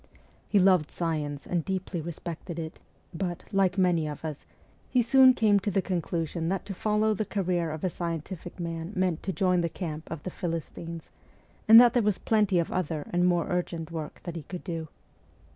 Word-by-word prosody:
He 205 Hz, -, +2 dB
loved 185 Hz, -5 st, +4 dB
science 150 Hz, -4 st, -3 dB
and 175 Hz, -2 st, -1 dB
deeply 185 Hz, -1 st, -3 dB
respected 170 Hz, +1 st, -6 dB
it, 160 Hz, -1 st, -6 dB, 0.3 s
but, 175 Hz, 0 st, -3 dB
like 195 Hz, -1 st, +2 dB
many 175 Hz, -4 st, +2 dB
of 150 Hz, +1 st, -6 dB
us, 150 Hz, -3 st, -6 dB, 0.4 s
he 250 Hz, -2 st, +3 dB
soon 260 Hz, +2 st, +7 dB
came 210 Hz, -4 st, +4 dB
to 200 Hz, -, -2 dB
the 195 Hz, 0 st, +1 dB
conclusion 170 Hz, -2 st, -2 dB
that 195 Hz, 0 st, -2 dB
to 200 Hz, -, -5 dB
follow 215 Hz, +2 st, +1 dB
the 215 Hz, -, -1 dB
career 180 Hz, -4 st, -1 dB
of 155 Hz, 0 st, -6 dB
a 185 Hz, -, +2 dB
scientific 170 Hz, +2 st, -5 dB
man 165 Hz, +2 st, -4 dB
meant 185 Hz, -3 st, 0 dB
to 190 Hz, -, -2 dB
join 180 Hz, -2 st, +2 dB
the 170 Hz, -, 0 dB
camp 160 Hz, -3 st, -6 dB
of 160 Hz, -2 st, -6 dB
the 185 Hz, -, -4 dB
Philistines, 165 Hz, -1 st, -5 dB, 0.6 s
and 225 Hz, +1 st, +11 dB
that 240 Hz, -1 st, +7 dB
there 245 Hz, -, +3 dB
was 210 Hz, -3 st, +1 dB
plenty 210 Hz, -4 st, +2 dB
of 170 Hz, -, 0 dB
other 160 Hz, -4 st, -2 dB
and 175 Hz, +1 st, +3 dB
more 175 Hz, -2 st, +2 dB
urgent 170 Hz, -2 st, -2 dB
work 160 Hz, -2 st, -6 dB
that 175 Hz, -2 st, -6 dB
he 165 Hz, -, -4 dB
could 180 Hz, +4 st, -8 dB
do. 165 Hz, -3 st, -4 dB
175 Hz, 195 wpm, -28 LUFS, 165-195 Hz, 0.6 s, and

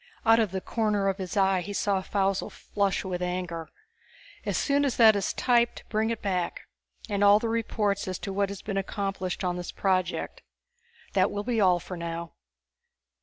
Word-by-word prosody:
Out 225 Hz, 0 st, +6 dB
of 220 Hz, -3 st, +2 dB
the 190 Hz, +1 st, -4 dB
corner 210 Hz, -3 st, 0 dB
of 195 Hz, +1 st, -2 dB
his 190 Hz, +2 st, -4 dB
eye 190 Hz, -1 st, +3 dB
he 205 Hz, +4 st, -6 dB
saw 200 Hz, -1 st, +1 dB
Faussel 195 Hz, 0 st, 0 dB
flush 200 Hz, -1 st, -1 dB
with 180 Hz, -1 st, -3 dB
anger. 180 Hz, -2 st, -3 dB, 0.8 s
"As -, -, 0 dB
soon 285 Hz, 0 st, +2 dB
as 275 Hz, -3 st, 0 dB
that 220 Hz, -2 st, +7 dB
is 200 Hz, -2 st, 0 dB
typed 240 Hz, -1 st, +1 dB
bring 220 Hz, +1 st, +1 dB
it 230 Hz, -1 st, -3 dB
back. 185 Hz, -3 st, -1 dB, 0.5 s
And 205 Hz, -2 st, 0 dB
all 205 Hz, 0 st, +8 dB
the 230 Hz, -, -2 dB
reports 210 Hz, -3 st, 0 dB
as 185 Hz, -1 st, -2 dB
to 195 Hz, -, -4 dB
what 200 Hz, 0 st, +1 dB
has 200 Hz, -1 st, -7 dB
been 200 Hz, -2 st, -3 dB
accomplished 195 Hz, -1 st, -3 dB
on 180 Hz, -1 st, -1 dB
this 175 Hz, -, -5 dB
project. 185 Hz, -2 st, -1 dB, 0.7 s
That 190 Hz, 0 st, +3 dB
will 205 Hz, 0 st, -3 dB
be 230 Hz, -1 st, 0 dB
all 180 Hz, -2 st, +4 dB
for 180 Hz, +1 st, -7 dB
now." 170 Hz, 0 st, -5 dB
195 Hz, 185 wpm, -27 LUFS, 185-210 Hz, 0.8 s, all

